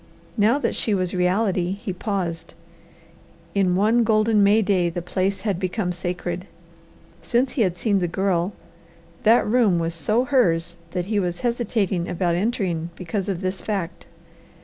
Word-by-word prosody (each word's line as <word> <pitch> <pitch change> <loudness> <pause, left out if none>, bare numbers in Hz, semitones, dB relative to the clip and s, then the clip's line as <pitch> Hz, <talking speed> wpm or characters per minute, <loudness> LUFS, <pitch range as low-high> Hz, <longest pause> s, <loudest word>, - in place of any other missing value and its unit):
Now 225 +4 +3
that 290 - -1
she 215 -4 0
was 185 -2 -1
reality, 180 0 +1
he 200 -1 -5
paused. 180 -4 -3 1.0
In 190 -3 +2
one 220 +5 +3
golden 215 -1 +3
May 205 +2 +5
day 185 -3 +2
the 170 - -4
place 190 +2 -1
had 200 -4 -1
become 185 0 -1
sacred. 180 +1 -4 0.7
Since 250 +2 +1
he 250 - -1
had 180 -4 +1
seen 205 -1 +1
the 175 - 0
Girl 180 0 0 0.7
that 225 +2 +5
room 215 -5 +3
was 165 0 -1
so 215 +9 +1
hers 175 -11 +2
that 180 -2 -3
he 210 +1 0
was 175 -2 -2
hesitating 220 -7 -1
about 175 0 0
entering 180 -4 -1
because 190 +2 -3
of 185 -2 -2
this 185 0 -3
fact. 195 -5 -4
190 Hz, 155 wpm, -23 LUFS, 175-215 Hz, 1.0 s, May